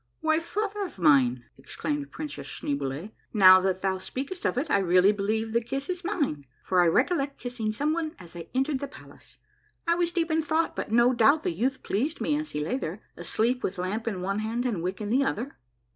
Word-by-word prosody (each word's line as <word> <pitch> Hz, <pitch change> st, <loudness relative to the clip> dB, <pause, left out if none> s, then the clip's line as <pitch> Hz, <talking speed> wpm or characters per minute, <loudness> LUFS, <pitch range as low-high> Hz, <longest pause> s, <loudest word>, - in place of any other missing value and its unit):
" -, -, -47 dB
Why, 315 Hz, 0 st, +2 dB
father 410 Hz, +4 st, -3 dB
of 360 Hz, -, -7 dB
mine," 130 Hz, -7 st, +4 dB
exclaimed 290 Hz, -, -4 dB
Princess 305 Hz, -1 st, -6 dB
Schneeboule, 140 Hz, +7 st, -3 dB
" -, -, -42 dB
now 185 Hz, 0 st, +10 dB
that 190 Hz, 0 st, -1 dB
thou 190 Hz, -1 st, 0 dB
speakst 270 Hz, -, -5 dB
of -, -, +1 dB
it, 290 Hz, +3 st, -1 dB
I -, -, +4 dB
really 185 Hz, +1 st, +5 dB
believe 220 Hz, +2 st, -1 dB
the 235 Hz, -, +3 dB
kiss 270 Hz, +5 st, -4 dB
is 360 Hz, 0 st, -3 dB
mine, 285 Hz, -, -2 dB, 0.2 s
for 185 Hz, -1 st, +3 dB
I 175 Hz, -, +4 dB
recollect 275 Hz, -, +1 dB
kissing 245 Hz, -3 st, -3 dB
someone 310 Hz, +6 st, -1 dB
as 175 Hz, -2 st, -13 dB
I 170 Hz, -, -7 dB
entered 270 Hz, +1 st, +1 dB
the 280 Hz, -, -4 dB
palace, 275 Hz, -, -15 dB, 0.5 s
I 335 Hz, -, +3 dB
was 345 Hz, 0 st, 0 dB
deep 335 Hz, -2 st, 0 dB
in 320 Hz, 0 st, +2 dB
thought, 320 Hz, +2 st, 0 dB
but -, -, -4 dB
no 240 Hz, +2 st, +5 dB
doubt 275 Hz, +6 st, +4 dB
the -, -, 0 dB
youth 255 Hz, +10 st, -1 dB
pleased 275 Hz, -, -1 dB
me 295 Hz, -, +1 dB
as 305 Hz, +1 st, -3 dB
he 150 Hz, -, -3 dB
lay 160 Hz, +12 st, -1 dB
there, 195 Hz, -4 st, -5 dB
asleep 225 Hz, +9 st, 0 dB
with 190 Hz, -, -3 dB
lamp 200 Hz, +6 st, -3 dB
in 195 Hz, -5 st, -2 dB
one 195 Hz, +2 st, -1 dB
hand 230 Hz, +3 st, -2 dB
and 215 Hz, -9 st, -1 dB
wick 185 Hz, +4 st, -3 dB
in 210 Hz, 0 st, -3 dB
the 265 Hz, +3 st, +4 dB
other." 270 Hz, 0 st, -3 dB
235 Hz, 220 wpm, -27 LUFS, 185-300 Hz, 0.5 s, now